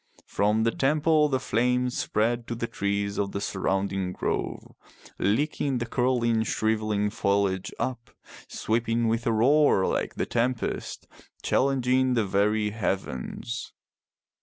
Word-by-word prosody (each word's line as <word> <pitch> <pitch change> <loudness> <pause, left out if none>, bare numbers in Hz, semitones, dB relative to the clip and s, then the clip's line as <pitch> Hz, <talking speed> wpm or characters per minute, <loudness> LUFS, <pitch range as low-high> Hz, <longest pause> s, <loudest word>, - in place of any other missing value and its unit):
From 105 +2 +1
the 115 - +2
temple 150 +3 +2
the 130 -2 +1
flames 125 +2 0
spread 120 +2 0
to 120 - -3
the 115 - -2
trees 100 -2 -2
of 100 -1 -1
the 100 - -2
surrounding 95 -1 -1
grove, - - -3 0.5
licking 135 +5 0
the 120 - -2
curling 120 -2 +1
shrivelling 110 -2 0
foliage 100 -2 0
up, 120 -3 -3 0.4
sweeping 115 +1 0
with 115 +1 0
a - - +3
roar 125 -2 +4
like - - -1
the - - -1
tempest, 120 0 -2 0.4
challenging 130 -1 +2
the 115 -3 +2
very 105 +2 +1
heavens. 100 - -4
115 Hz, 125 wpm, -26 LUFS, 100-125 Hz, 0.5 s, roar